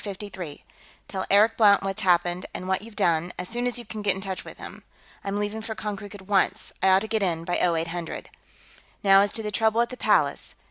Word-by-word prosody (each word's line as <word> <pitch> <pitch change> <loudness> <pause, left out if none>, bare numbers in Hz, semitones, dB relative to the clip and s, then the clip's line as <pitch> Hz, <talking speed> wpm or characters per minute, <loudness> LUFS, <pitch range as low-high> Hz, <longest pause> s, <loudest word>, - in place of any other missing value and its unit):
Tell 190 -1 -4
Eric 215 +3 +5
Blount 205 -3 +6
what's 195 0 -3
happened, 175 0 +2
and 185 - -5
what 190 0 +1
you've 220 0 -12
done, 170 0 +1
as 180 - -4
soon 240 +3 -2
as 245 - -1
you 240 - -5
can 215 0 -6
get 200 -2 +2
in 190 - -6
touch 190 -1 -4
with - - -10
him. - - -10 0.4
I'm 200 0 -2
leaving 210 +1 -2
for 220 0 -5
Konkrook 205 -1 -6
at 195 - -11
once; 195 -1 +1
I - - +3
ought 190 +1 +5
to 220 - -4
get 220 -1 0
in 165 -4 -1
by 175 - 0
0800. 170 0 -2 0.7
"Now, 195 -1 +7
as 200 0 +2
to 225 - -3
the 210 - -3
trouble 220 +2 +2
at 235 - +2
the 255 - -8
Palace. - - +1
200 Hz, 225 wpm, -25 LUFS, 185-220 Hz, 0.7 s, Now